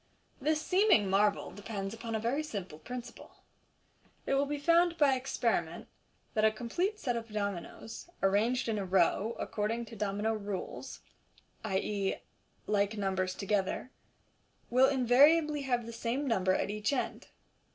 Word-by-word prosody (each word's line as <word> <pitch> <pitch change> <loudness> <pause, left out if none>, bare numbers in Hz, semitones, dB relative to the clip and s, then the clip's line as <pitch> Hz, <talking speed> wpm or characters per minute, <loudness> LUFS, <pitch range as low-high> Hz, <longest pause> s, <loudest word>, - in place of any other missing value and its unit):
This 305 +3 +2
seeming 365 - +4
marvel 205 +1 +2
depends 205 -1 -5
upon 225 0 -5
a - - 0
very 240 +7 0
simple 195 - -6
principle. 245 +3 -9 0.8
It - - 0
will 275 +1 +2
be 295 +1 -2
found 335 +3 +3
by 290 -4 +5
experiment 260 +1 -1 0.5
that 215 - +1
a 220 - +6
complete 345 - -2
set 250 - -1
of 230 -1 -5
dominoes, 200 - -5
arranged 225 +7 +2
in 220 -2 0
a - - -2
row 195 +4 +2
according 225 +2 -2
to 225 0 -11
domino 210 +1 -1
rules 205 -3 -5 0.6
(i.e., 195 -1 -1 0.5
like 205 +1 +1
numbers 190 -2 -1
to - - -6
gether), 200 +5 -1 0.8
will 255 +2 +6
invariably 285 +4 +4
have 245 -3 0
the 230 - -7
same 245 +5 -2
number 190 -6 +2
at - - -1
each 210 +2 -1
end. 275 - -2
225 Hz, 145 wpm, -31 LUFS, 200-265 Hz, 0.8 s, a